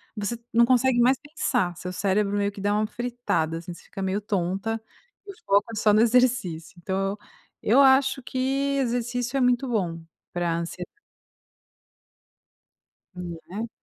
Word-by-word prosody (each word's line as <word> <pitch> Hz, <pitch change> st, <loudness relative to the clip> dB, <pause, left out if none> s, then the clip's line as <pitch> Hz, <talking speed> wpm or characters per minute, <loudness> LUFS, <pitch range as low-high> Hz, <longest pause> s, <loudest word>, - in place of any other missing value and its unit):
você 210 Hz, +2 st, -3 dB, 0.2 s
não 235 Hz, +1 st, +6 dB
consegue 255 Hz, 0 st, +3 dB
mais 255 Hz, +2 st, +5 dB
pensar, 190 Hz, -, -1 dB
seu 180 Hz, +1 st, -5 dB
cérebro 200 Hz, +2 st, +1 dB
meio 200 Hz, 0 st, +1 dB
que 200 Hz, -, -9 dB
dá 205 Hz, +1 st, +1 dB
uma 215 Hz, +1 st, +2 dB
fritada, 240 Hz, -10 st, -2 dB
assim, 175 Hz, +1 st, -7 dB
você -, -, -15 dB
fica 195 Hz, -, -8 dB
meio 190 Hz, +2 st, -1 dB
tonta, 195 Hz, +3 st, -1 dB, 0.7 s
foca 200 Hz, +3 st, +2 dB
só 215 Hz, 0 st, +3 dB
no 215 Hz, -, +5 dB
exercício, 230 Hz, -10 st, +2 dB
então 190 Hz, +2 st, -1 dB
eu 205 Hz, -, -6 dB, 0.5 s
eu 240 Hz, +6 st, +4 dB
acho 265 Hz, 0 st, +4 dB
que 270 Hz, +2 st, -1 dB
exercício 245 Hz, 0 st, -1 dB
é -, -, +1 dB
muito 250 Hz, +1 st, +2 dB
bom 175 Hz, -8 st, -1 dB, 0.3 s
pra 175 Hz, -1 st, 0 dB
ansiedade. 170 Hz, +1 st, -5 dB, 2.3 s
Hum, 175 Hz, -2 st, -6 dB
né. 220 Hz, +5 st, -5 dB
215 Hz, 150 wpm, -25 LUFS, 185-245 Hz, 2.3 s, não